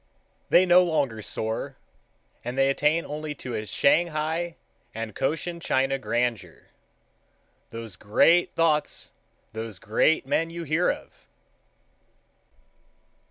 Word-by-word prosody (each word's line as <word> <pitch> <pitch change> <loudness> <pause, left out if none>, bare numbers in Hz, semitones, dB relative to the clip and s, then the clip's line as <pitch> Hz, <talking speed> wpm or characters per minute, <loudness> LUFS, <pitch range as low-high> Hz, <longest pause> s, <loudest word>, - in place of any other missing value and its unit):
They 185 - +6
no 180 0 +6
longer 145 -10 -1
soar, 110 +6 -3 0.7
and 125 +2 -5
they 135 0 +4
attain 150 +4 +1
only 150 0 -5
to 125 -3 -7
a 110 -1 -4
Shanghai 160 +4 +1 0.4
and 115 -1 -5
Cochin 165 - -2
China 135 -3 0
grandeur. 120 -3 -2 1.0
Those 115 -4 -8
gra 105 +2 +1
a - - +8
ate - - -9
thoughts, 160 -3 0 0.4
those 110 -2 -6
gra 105 +4 -1
a - - +7
ate 160 - -7
men 160 +4 0
you 170 0 -6
hear 165 +3 +1
of! - - -11
140 Hz, 125 wpm, -26 LUFS, 115-165 Hz, 1.0 s, a